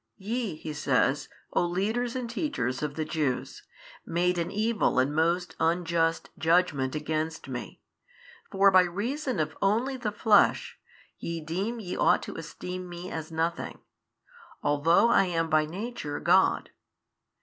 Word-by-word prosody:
YE 215 -2 -3
(He 155 0 -6
says) 140 0 +1 0.2
O - - +3
leaders 215 +8 -1
and 250 -2 -3
teachers 235 - -2
of 150 -1 -3
the 155 - -2
Jews, 150 -5 -2 0.4
made 175 +1 0
an 170 - -1
evil 215 +2 +1
and 130 +3 +2
most 170 +2 +1
unjust 165 0 +1
judgment 160 -5 +2
against 155 +1 -3
Me: 125 -3 -7 0.7
for 195 0 +5
by 185 -1 +7
reason 235 - -2
of 155 - -1
only 235 +7 +1
the 225 -4 -2
flesh, 220 - +3 0.4
ye 170 0 -4
deem 190 +9 -3
ye 185 -5 -5
ought - - +3
to - - -7
esteem 180 +3 -6
Me 175 +1 -7
as 160 0 -5
nothing, 165 +1 -2 0.9
although 165 +10 +4
I 195 -4 +5
am 165 -2 -1
by 155 0 +3
Nature 185 -4 -5
God. - - +3
175 Hz, 140 wpm, -28 LUFS, 155-210 Hz, 0.9 s, by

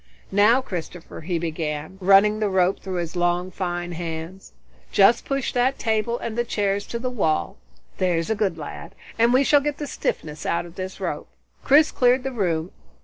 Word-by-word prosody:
"Now 215 +6 +4
Christopher," 175 -5 -7
he 175 +2 -2
began, 160 +1 -4
running 200 +3 +5
the 210 -2 +1
rope 190 0 +2
through 190 -1 -5
his 170 -1 -3
long, 175 +1 0
fine 175 -2 -3
hands, 165 +2 -6 0.4
"just 205 +4 +4
push 275 -2 -2
that 255 +2 +1
table 220 +1 0
and 225 -2 -5
the 240 - +1
chairs 205 -3 -1
to 235 - -4
the 250 +2 -3
wall, 190 -3 0 0.4
there's 175 -1 0
a - - +2
good 200 -5 -1
lad, 165 +4 -8 0.2
and 230 +1 +5
we 260 +2 +4
shall 290 +1 +4
get 295 0 -2
the 295 - -4
stiffness 155 - -4
out 170 - -1
of 170 - -12
this 185 +1 -6
rope." - - -4 0.4
Chris 300 +3 +5
cleared 250 +1 +3
the 270 - -3
room. 175 -7 -1
190 Hz, 185 wpm, -23 LUFS, 175-235 Hz, 0.4 s, running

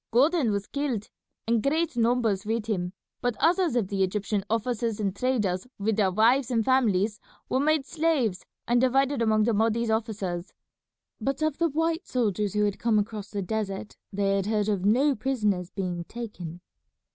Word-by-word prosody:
"Gordon 270 +1 +3
was 200 -1 -1
killed, 265 -7 -3 0.4
and 230 -1 +2
great 310 +3 0
numbers 230 -4 +2
with 225 0 -1
him; 185 -5 -2 0.3
but 245 -2 -1
others 345 -4 +3
of 230 -6 +1
the 195 -1 -1
Egyptian 200 +1 0
officers 230 -1 -1
and 200 -2 -1
traders 210 -5 0
with 210 +1 0
their 200 -3 +3
wives 230 +6 +3
and 230 -3 +1
families 215 -5 +2 0.3
were 260 - +1
made 305 0 +2
slaves 290 - 0 0.2
and 240 0 +3
divided 270 +1 +2
among 215 -1 +3
the 230 +1 +2
Mahdi's 225 +2 +1
officers. 205 -6 -2 0.7
But 275 +3 -1
of 310 0 0
the 335 -1 +3
white 325 +4 -1
soldiers 210 -5 0
who 210 0 +3
had 205 -1 -2
come 230 -2 +2
across 210 0 -2
the 200 -2 -3
desert, 205 +1 -3 0.2
they 195 0 +1
had 195 0 -1
heard 215 -1 +1
of 200 -3 0
no 265 +8 +4
prisoners 210 -8 -1
being 180 -4 -3
taken." 180 -8 -7
220 Hz, 170 wpm, -27 LUFS, 200-255 Hz, 0.7 s, no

